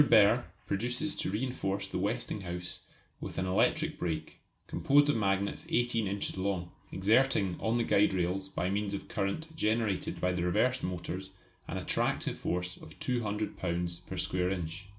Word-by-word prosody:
Behr 115 -3 +6 0.2
proposes 125 +9 -1
to - - -1
reinforce 100 -3 -1
the 95 - -3
Westinghouse 95 -5 -3 0.3
with - - -6
an 95 - 0
electric 150 +12 +2
brake, 80 -3 -3 0.3
composed 145 +1 +4
of - - +3
magnets 100 -2 0
18 120 -3 +2
inches 100 -1 -2
long, 95 -3 -1 0.2
exerting 105 -1 +3
on 115 +1 +1
the 120 - +2
guide 105 -1 +4
rails 95 +1 0
by 90 - -1
means 100 +1 0
of 100 - -6
current 130 +12 -2
generated 110 - 0
by 90 - +2
the 90 -1 -1
reversed 110 +9 +2
motors 90 +1 -3 0.4
an - - -3
attractive - - 0
force 90 0 -2
of - - -13
200 110 -4 -1
lbs. 85 0 -2
per 95 - -5
square 90 0 +1
inch. 90 0 -3
100 Hz, 155 wpm, -31 LUFS, 90-115 Hz, 0.4 s, Behr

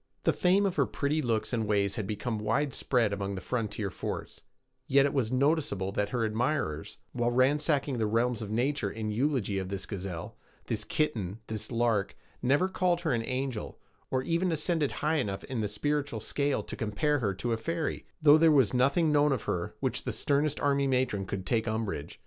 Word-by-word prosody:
The - - +3
fame 190 +3 +3
of 190 -4 -1
her 140 - +3
pretty 150 +2 0
looks 115 -2 -1
and 110 -2 0
ways 100 -2 +1
had 105 - -3
become 110 +2 -3
widespread 115 0 +1
among 100 0 -3
the - - -4
frontier 105 -3 -2
forts; - - -5 0.5
yet 140 +1 +5
it 140 - 0
was 130 -6 0
noticeable 135 - +1
that 100 +1 -1
her 120 -1 0
admirers, 110 - -1
while 120 -1 0
ransacking 140 +1 +2
the 110 - +1
realms 115 +2 +1
of 105 - -5
nature 120 0 0
in 110 +1 -4
eulogy 115 -5 0
of 95 -1 -4
this 100 -1 -4
gazelle, 95 -4 -6 0.3
this 105 -2 -3
kitten, 110 - -1
this 110 +1 -5
lark, 115 -4 +1 0.3
never 140 +9 +3
called 180 -2 +1
her 165 -3 0
an 115 - +1
angel, 130 -2 -3 0.3
or 130 0 0
even 170 +4 +1
ascended 160 -2 0 0.2
high 155 +1 +3
enough 100 -8 -2
in 130 -5 -3
the 105 - 0
spiritual 145 +3 -1
scale 140 +6 -1
to - - -7
compare 140 +7 0
her 100 -6 -1
to 115 +5 -1
a - - 0
fairy, 165 +7 -3 0.2
though 150 0 +8
there 165 0 +6
was 135 -9 +4
nothing 140 +6 +3
known 150 0 +4
of 130 -5 -1
her 85 -1 -1
at - - -10
which - - -1
the - - -2
sternest 145 +1 0
army 140 -1 +2
matron 125 -7 0
could 95 -1 -4
take 115 +2 +1
umbrage. 110 -9 -3
125 Hz, 195 wpm, -29 LUFS, 105-145 Hz, 0.5 s, though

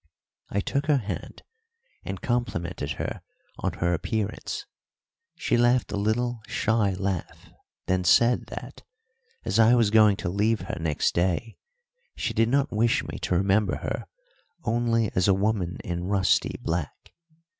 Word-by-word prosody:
I 100 - 0
took 140 +8 -2
her 150 -2 +4
hand 110 -5 -6 0.6
and 95 -1 -6
complimented 120 -9 -2
her - - -4 0.4
on - - -1
her 85 0 0
appearance. 105 +5 -3 0.7
She - - 0
laughed 120 +1 +3
a - - -2
little 115 +3 0
shy 105 -3 +1
laugh, 95 -3 -4 0.3
then 95 0 +1
said 120 +8 +4
that, - - -8 0.6
as - - +1
I 115 +2 +7
was 115 -4 +3
going 105 -2 +6
to 105 - -3
leave 105 +4 +1
her 95 - -5
next 80 -2 0
day, 90 +6 -1 0.6
she - - -2
did 115 0 +2
not 140 +3 +2
wish 115 +2 +2
me - - -7
to - - -1
remember 100 +2 +2
her - - -4 0.6
only 115 -2 +1
as 90 +1 +2
a 100 - +5
woman 95 -3 0
in 85 0 -3
rusty 95 -1 +2
black. 80 -3 -4
105 Hz, 145 wpm, -26 LUFS, 95-115 Hz, 0.7 s, I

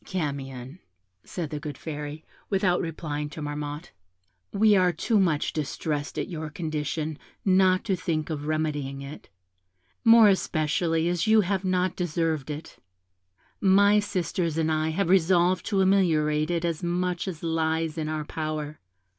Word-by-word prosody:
"'Camion,' 140 -4 -5 0.4
said 165 -5 -5
the 150 - -3
good 145 -2 -6
Fairy, 150 0 -6 0.2
without 190 -3 +2
replying 150 -3 -4
to 150 - -9
Marmotte, 145 +1 -5 0.6
'we 210 +1 +4
are 180 -2 +4
too 210 +6 +1
much 165 -6 +1
distressed 150 -1 -3
at - - -2
your 160 -3 -5
condition 155 -1 -3 0.3
not 185 -1 +4
to 195 - 0
think 160 -3 -2
of 150 -1 -4
remedying 145 -3 -2
it, 140 +2 -10 0.7
more 225 -1 +8
especially 165 -3 +1
as 175 +1 0
you 220 0 +6
have 190 0 -1
not 185 -1 0
deserved 165 -4 -1
it. 150 +2 -7 0.8
My 200 +2 +5
sisters 180 -5 -2
and 160 -1 +1
I 155 0 +1
have 170 +3 0
resolved 180 0 +3
to 200 -3 +2
ameliorate 155 -6 +2
it 170 0 0
as 165 -1 -2
much 180 +1 -1
as 170 -4 -6
lies 160 -1 0
in 155 -2 -3
our 155 -1 -3
power. 155 -1 -4
160 Hz, 145 wpm, -26 LUFS, 150-185 Hz, 0.8 s, more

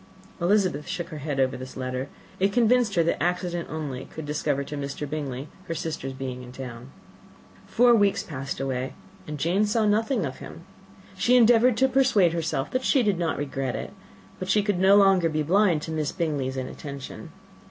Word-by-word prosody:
Elizabeth 180 -5 +1
shook 175 - -4
her 155 -3 -7
head 145 -1 -3
over 130 0 +2
this 130 +1 -8
letter. 130 +1 -3 0.3
It 195 +1 +2
convinced 235 -1 +3
her 170 - +4
that 170 - -1
accident 175 -1 -1
only 145 -5 -5
could 160 - -8
discover 145 -1 -1
to 145 +2 -7
Mr. 140 +1 -4
Bingley 140 -2 -4 0.2
her 165 - -3
sister's 150 -5 -4
being 130 -1 -5
in 125 0 -10
town. 125 -1 -8 0.8
Four 245 0 +5
weeks 205 -3 +3
passed 135 -4 -5
away, 130 -1 -2 0.3
and 150 - -5
Jane 180 +8 +1
saw 215 +1 +1
nothing 220 - +1
of 130 - -6
him. 165 - -10 0.5
She 245 +6 +3
endeavoured 240 0 +5
to 265 - +4
persuade 250 -10 +3
herself 160 -4 -2
that 255 0 -1
she 265 -2 +3
did 205 -5 +1
not 165 -2 -1
regret 135 -3 -3
it; - - -6 0.5
but 185 - -5
she 210 +1 +3
could 200 -3 0
no 190 +2 +6
longer 195 -4 +5
be 155 -1 -1
blind 175 -1 +3
to 160 - -5
Miss 155 -2 -1
Bingley's 140 -5 -2
inattention. 140 +1 -7
160 Hz, 185 wpm, -26 LUFS, 135-200 Hz, 0.8 s, no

